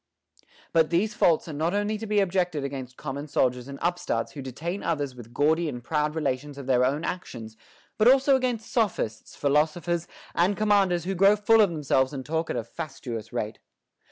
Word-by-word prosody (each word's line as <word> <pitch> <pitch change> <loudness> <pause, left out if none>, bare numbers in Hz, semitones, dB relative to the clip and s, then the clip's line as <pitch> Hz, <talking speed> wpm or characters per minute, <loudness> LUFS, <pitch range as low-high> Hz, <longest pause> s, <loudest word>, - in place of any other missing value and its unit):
But 160 -1 +4
these 200 +5 +1
faults 170 -6 +3
are 160 - -6
not 160 +6 0
only 205 +1 0
to 225 - -5
be 205 -1 +3
objected 180 -5 0
against 130 -2 -6
common 140 +1 -5
soldiers 125 -3 0
and 140 0 -7
upstarts 170 -10 -1
who 145 - -7
detain 160 +9 -5
others 145 -5 -1
with 120 -2 -12
gaudy 155 +5 +2
and 125 -4 -7
proud 150 +2 0
relations 145 -2 -2
of 140 - -7
their 125 -1 +3
own 140 +5 +1
actions, 115 -11 -6 0.4
but 215 - +5
also 270 +2 +6
against 250 -4 -1
sophists, 185 - -1
philosophers, 160 +4 +1 0.3
and 185 +4 +2
commanders 200 -5 +3
who 190 +2 -2
grow 195 +3 +5
full 220 +2 +4
of 205 - +5
themselves 140 -4 +1
and 130 -2 -5
talk 160 +1 -2
at - - -2
a - - -1
fastuous 120 -3 -7
rate. - - -3
160 Hz, 185 wpm, -26 LUFS, 135-195 Hz, 0.4 s, also